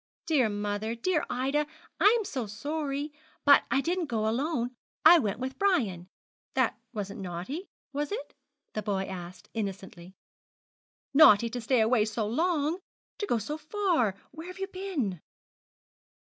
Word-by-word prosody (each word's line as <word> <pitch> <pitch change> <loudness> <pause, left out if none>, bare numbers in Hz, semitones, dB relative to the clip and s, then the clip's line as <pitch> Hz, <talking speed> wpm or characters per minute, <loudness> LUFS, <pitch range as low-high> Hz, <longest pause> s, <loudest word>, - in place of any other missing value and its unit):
'Dear 285 -9 +3
mother, 205 +2 -2
dear 310 +7 +1
Ida, 275 +4 0 0.3
I 420 +3 +6
am 435 - -3
so 255 - -3
sorry. 285 +6 -3 0.3
But 285 -1 +7
I 270 - +3
didn't 345 +2 -1
go 220 -4 0
alone. 245 +1 0 0.3
I 345 - +10
went 210 -7 -1
with 260 +2 -5
Brian. 220 - +1 0.5
That 260 -3 +2 0.2
wasn't 200 -4 -5
naughty, 190 - -5 0.2
was 295 +3 -2
it?' 450 +4 -5 0.4
the 215 - -2
boy 200 -2 -1
asked, 180 -1 -8
innocently. 190 -4 -5 1.0
'Naughty 235 -7 +7
to 245 - -3
stay 235 +1 +3
away 220 -1 +4
so 220 0 -2
long 315 - +1 0.4
to 410 - -2
go 240 - +2
so 295 +9 -4
far. 310 - +1 0.2
Where 320 +4 -9
have 365 - -8
you 385 - -2
been?' 315 - -3
255 Hz, 145 wpm, -29 LUFS, 210-315 Hz, 1.0 s, I